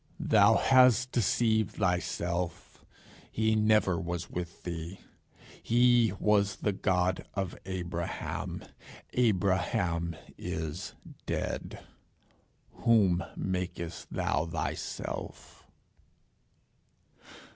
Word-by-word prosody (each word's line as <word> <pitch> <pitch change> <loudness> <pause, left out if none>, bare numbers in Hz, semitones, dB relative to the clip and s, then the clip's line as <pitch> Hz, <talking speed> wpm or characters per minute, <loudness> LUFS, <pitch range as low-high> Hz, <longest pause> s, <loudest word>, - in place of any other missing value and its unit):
Thou 110 +1 +5
hast 125 -1 +5
deceived 110 -1 +1
thyself. 90 -2 -2 0.5
He 110 0 +1
never 105 -4 +3
was 85 0 -4
with 85 -1 -6
thee. 85 +1 -5 0.6
He 120 -2 +4
was 100 -1 +2
the 105 - -1
God 90 -1 0
of 95 -2 -2
Abraham. 85 -2 -4 0.5
Abraham 95 -6 +1 0.2
is 80 -2 -4 0.3
dead. - - -3 0.9
Whom 95 -6 +3
makest 90 -2 -4
thou 80 +2 0
thyself?" 80 - -5
95 Hz, 75 wpm, -30 LUFS, 85-110 Hz, 0.9 s, Thou